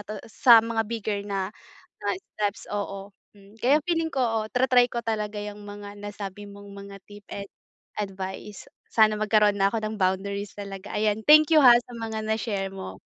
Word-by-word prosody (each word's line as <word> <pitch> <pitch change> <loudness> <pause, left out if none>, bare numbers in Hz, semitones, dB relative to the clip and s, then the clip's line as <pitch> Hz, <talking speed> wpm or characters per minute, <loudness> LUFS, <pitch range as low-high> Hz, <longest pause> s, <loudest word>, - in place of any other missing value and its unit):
to 215 +1 -7
sa 230 0 +6
mga 230 -1 -1
bigger 215 -3 -2
na 195 -2 -2 0.5
na - - -1 0.3
steps, 205 -1 -2
oo. 200 -1 -4 0.3
mm, 200 +2 -18
kaya 275 +5 +5
feeling 330 -1 +1
ko, - - -3
oo, 225 -2 +1
tra-try 250 -1 +4
ko 240 - -2
talaga 210 -1 -2
yang 210 0 -7
mga 205 0 -9
nasabi 205 -1 -7
mong 200 0 -12
mga 200 0 -10
tip 205 0 -12
and 200 0 -5 0.5
advice. 195 0 -6 0.2
Sana 215 -1 +4
magkaroon 210 -1 +3
na 195 - +5
ako 230 - -1
ng 215 0 -3
boundaries 200 +2 -1
talaga, 200 -1 -8
ayan 215 0 +1
thank 305 +1 +7
you, 310 - +7
ha, 245 -2 +9
sa 245 0 -10
mga 220 -1 -4
na 220 - +1
share 195 -3 -2
mo. 95 - -8
205 Hz, 185 wpm, -25 LUFS, 200-225 Hz, 0.5 s, ha